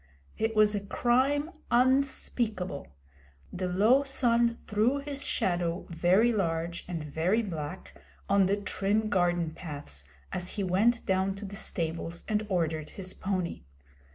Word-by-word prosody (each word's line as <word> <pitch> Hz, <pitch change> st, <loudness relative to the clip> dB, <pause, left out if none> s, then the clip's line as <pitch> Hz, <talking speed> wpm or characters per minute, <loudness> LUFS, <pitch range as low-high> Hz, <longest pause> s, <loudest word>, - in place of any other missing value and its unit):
It 220 Hz, 0 st, -1 dB
was 215 Hz, 0 st, +5 dB
a 205 Hz, -, 0 dB
crime 265 Hz, +9 st, +1 dB, 0.2 s
unspeakable. 240 Hz, -, +1 dB, 0.7 s
The 185 Hz, 0 st, -2 dB
low 215 Hz, +9 st, +4 dB
sun 240 Hz, -4 st, +2 dB
threw 220 Hz, +6 st, +2 dB
his 280 Hz, 0 st, -5 dB
shadow, 175 Hz, -5 st, -1 dB
very 185 Hz, +8 st, +3 dB
large 170 Hz, -4 st, -1 dB
and 170 Hz, -4 st, -4 dB
very 170 Hz, +9 st, +1 dB
black, 165 Hz, -3 st, -6 dB, 0.3 s
on 200 Hz, -1 st, +4 dB
the 200 Hz, +1 st, +1 dB
trim 205 Hz, +1 st, 0 dB
garden 175 Hz, -4 st, +1 dB
paths, 145 Hz, -, -8 dB, 0.3 s
as 180 Hz, 0 st, -2 dB
he 200 Hz, -, 0 dB
went 210 Hz, +6 st, +2 dB
down 190 Hz, 0 st, +1 dB
to 200 Hz, +1 st, -7 dB
the 200 Hz, 0 st, -7 dB
stables 165 Hz, -3 st, -2 dB
and 215 Hz, 0 st, 0 dB
ordered 160 Hz, -4 st, -1 dB
his 185 Hz, -1 st, -3 dB
pony. 185 Hz, -3 st, -3 dB
195 Hz, 135 wpm, -29 LUFS, 175-230 Hz, 0.7 s, was